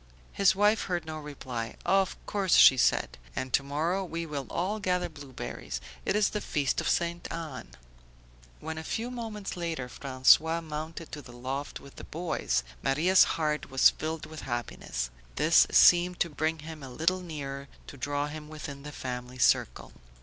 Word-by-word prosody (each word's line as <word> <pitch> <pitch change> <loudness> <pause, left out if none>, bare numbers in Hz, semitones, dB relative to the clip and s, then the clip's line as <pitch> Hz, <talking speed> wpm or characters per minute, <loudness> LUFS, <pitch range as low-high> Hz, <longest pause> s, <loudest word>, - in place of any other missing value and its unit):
His 195 -1 +4
wife 210 +2 +3
heard 175 -3 -2
no 155 0 -5
reply. 130 -6 -6
"Of 195 -1 +2
course!" 195 -4 0 0.3
said - - +2
she. - - -22
"And 130 0 -4
to - - +4
morrow 160 +7 -1
we 170 -2 -4
will 145 -4 -5
all 195 +5 -1
gather 180 -3 0
blueberries. 140 - -7 0.3
It 195 - +2
is 210 -2 +3
the 210 - -3
feast 145 -7 0
of - - -1
Ste. 170 0 -1
Anne." 155 - -6 0.9
When 160 0 -5
a - - -7
few 230 +8 -3
moments 220 -5 -5
later 165 -7 -3
François 140 +6 +3
mounted 160 +1 -6
to 150 - -6
the 125 - -13
loft 135 +3 -4
with 140 - -15
the - - -8
boys, 155 - -1 0.2
Maria's 160 +8 +5
heart 150 -2 -1
was 135 -1 +6
filled 160 0 -4
with 155 0 -9
happiness. 120 - -4 0.2
This - - +5
seemed 175 0 +6
to 170 - +1
bring 155 +2 -1
him 160 -2 -8
a 135 - -8
little 165 +8 +1
nearer, 140 -5 -6 0.2
to - - -10
draw 145 +1 -1
him 150 0 -7
within 150 -2 -7
the 150 +1 -8
family 125 -2 -6
circle. - - +2
155 Hz, 170 wpm, -29 LUFS, 140-175 Hz, 0.9 s, was